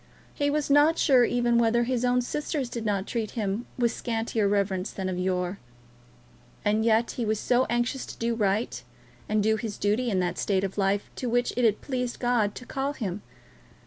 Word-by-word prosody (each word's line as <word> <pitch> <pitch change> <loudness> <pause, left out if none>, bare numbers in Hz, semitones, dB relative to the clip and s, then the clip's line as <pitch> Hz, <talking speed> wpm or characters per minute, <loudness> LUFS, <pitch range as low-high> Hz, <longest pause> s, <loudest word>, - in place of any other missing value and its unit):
He 285 0 0
was 290 -1 0
not 295 +3 +5
sure 255 -4 +5
even 240 -1 +2
whether 235 +1 +3
his 250 0 -1
own 250 0 +2
sisters 290 0 -3
did 230 -2 -5
not 200 -2 0
treat 225 -3 -3
him 210 +2 -2
with 240 -2 +2
scantier 225 -2 -1
reverence 200 -1 0
than 190 -1 -4
of 180 -1 -3
yore. 180 +1 -1 1.1
And 215 +1 +2
yet 230 +1 +3
he 245 - -3
was 215 -1 0
so 250 +1 +2
anxious 240 +2 -1
to - - -9
do 235 0 0
right, 210 0 0 0.5
and 215 -1 +2
do 220 +1 +2
his 215 -2 -5
duty 215 +5 +1
in 190 -4 +1
that 180 -1 -1
state 195 -2 +1
of 195 +1 -3
life 195 +1 0
to 250 - -2
which 245 +1 +1
it 245 0 +2
had 215 -2 +2
pleased 250 -3 -3
God 240 -4 +1
to 250 - -9
call 270 +2 -2
him! 205 -7 -4
230 Hz, 200 wpm, -27 LUFS, 205-245 Hz, 1.1 s, not